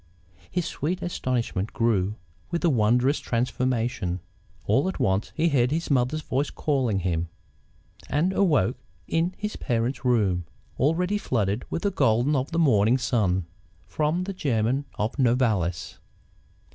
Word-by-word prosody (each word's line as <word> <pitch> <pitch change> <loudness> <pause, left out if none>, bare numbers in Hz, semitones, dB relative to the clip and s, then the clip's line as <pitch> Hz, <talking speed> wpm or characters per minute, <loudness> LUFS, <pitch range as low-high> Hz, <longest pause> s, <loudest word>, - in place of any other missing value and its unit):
His 180 -2 -1
sweet 175 +6 -3
astonishment 120 - -2
grew 105 -4 +1 0.3
with 170 - -2
the 170 - +4
wondrous 125 +4 +3
transformation. 120 -6 -1 0.5
All 135 - +2
at 190 - -6
once 100 -5 +1
he 165 +1 +2
heard 125 -4 +3
his 160 +2 -2
mother's 140 +4 +1
voice 140 +2 -1
calling 125 -10 0
him, 85 -2 -1 0.8
and 165 +7 +1
awoke 150 - +2 0.3
in 170 +3 0
his 210 0 -4
parents' 120 +2 -1
room, 100 -9 +2 0.3
already 180 - +1
flooded 105 - -1
with - - -3
the 200 - +1
gold 120 - +2
of 135 +3 -1
the 165 - -2
morning 125 -7 +4
sun. 105 -8 +1 0.4
From 155 +4 0
the 195 +1 -4
German 130 - 0
of 110 +7 -2
Novalis. 115 -9 +1
125 Hz, 135 wpm, -25 LUFS, 110-155 Hz, 0.8 s, the